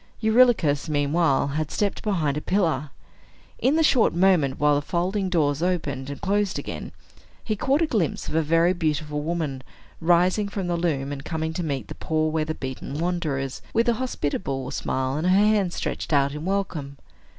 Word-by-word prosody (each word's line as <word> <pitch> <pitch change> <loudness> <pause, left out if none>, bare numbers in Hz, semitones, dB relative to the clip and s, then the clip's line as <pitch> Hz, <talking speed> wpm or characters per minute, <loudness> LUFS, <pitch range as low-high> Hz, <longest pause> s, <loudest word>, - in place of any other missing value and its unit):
Eurylochus, 220 - +3
meanwhile, 145 -1 +2
had 155 +1 -2
stepped 205 -1 -1
behind 165 -9 0
a 150 - -2
pillar. 160 -7 0 0.7
In 270 +4 +2
the 320 - +3
short 250 - +3
moment 175 -7 +3
while 150 0 +4
the 145 - +2
folding 185 +5 -1
doors 150 -4 +1
opened 150 -7 -1
and 140 - -6
closed 205 0 0
again, - - -6 0.5
he 215 - -1
caught 275 +9 +1
a - - +4
glimpse 210 - -1
of - - -5
a 160 - +3
very 165 +3 +3
beautiful 150 -3 -1
woman 155 -4 -2 0.4
rising 180 +4 +3
from 195 -2 -3
the 175 -1 0
loom, 150 -5 -1
and 140 -1 -6
coming 160 0 -3
to 175 - -3
meet 140 -8 -3
the - - -7
poor 155 0 -1
weather 155 0 -1
beaten 130 +1 -6
wanderers, 155 -6 -2
with 230 +2 +3
a 235 - +4
hospitable 140 - -2
smile, 130 -2 -2
and 160 +4 -1
her 185 +1 +5
hand 205 -3 +3
stretched - - -4
out 140 -2 +3
in 150 +2 -6
welcome. 175 -8 -2
160 Hz, 180 wpm, -24 LUFS, 145-190 Hz, 0.7 s, her